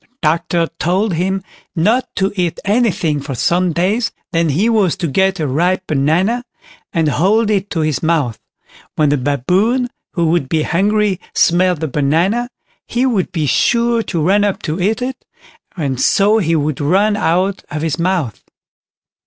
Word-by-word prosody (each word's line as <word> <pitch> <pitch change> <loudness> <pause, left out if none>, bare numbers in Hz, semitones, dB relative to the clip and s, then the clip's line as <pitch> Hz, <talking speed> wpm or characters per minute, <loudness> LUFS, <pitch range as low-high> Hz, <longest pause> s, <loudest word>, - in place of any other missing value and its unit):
The - - -33 0.2
doctor 165 +1 +1
told 185 +4 0
him 190 +3 -1 0.3
not 220 +10 +1
to 195 0 0
eat 175 -4 -1
anything 200 -8 +1
for 140 -1 -5
some 175 +7 +1
days, 200 +7 0 0.2
then 165 -1 +1
he 175 +11 +1
was 210 -7 +2
to - - -3
get 190 +6 +1
a 155 - 0
ripe 175 +7 0
banana, 170 - +1 0.5
and 165 -4 +1
hold 205 +9 +2
it 200 -1 0
to 165 - -2
his 155 -3 -1
mouth; 155 -9 0 0.6
when 150 -2 +2
the 145 - +2
Baboon, 185 - +1 0.2
who 170 - 0
would 165 -6 0
be 160 -2 +1
hungry, 200 +2 +1 0.2
smelt 175 -1 +2
the 160 - -1
banana, 165 - 0 0.4
he 245 +2 0
would 220 -8 0
be 160 -4 -1
sure 235 - +2
to 180 -6 -3
run 200 +5 +3
up 205 -2 -1
to 160 +2 -3
eat 220 +6 0
it, 260 +1 -5 0.5
and 135 -6 -2
so 210 +2 +3
he 165 -4 +1
would 150 -2 -1
run 195 +8 +2
out 190 +1 0
of 155 +1 -4
his 160 0 -2
mouth. 170 - -1
180 Hz, 170 wpm, -16 LUFS, 155-205 Hz, 0.6 s, run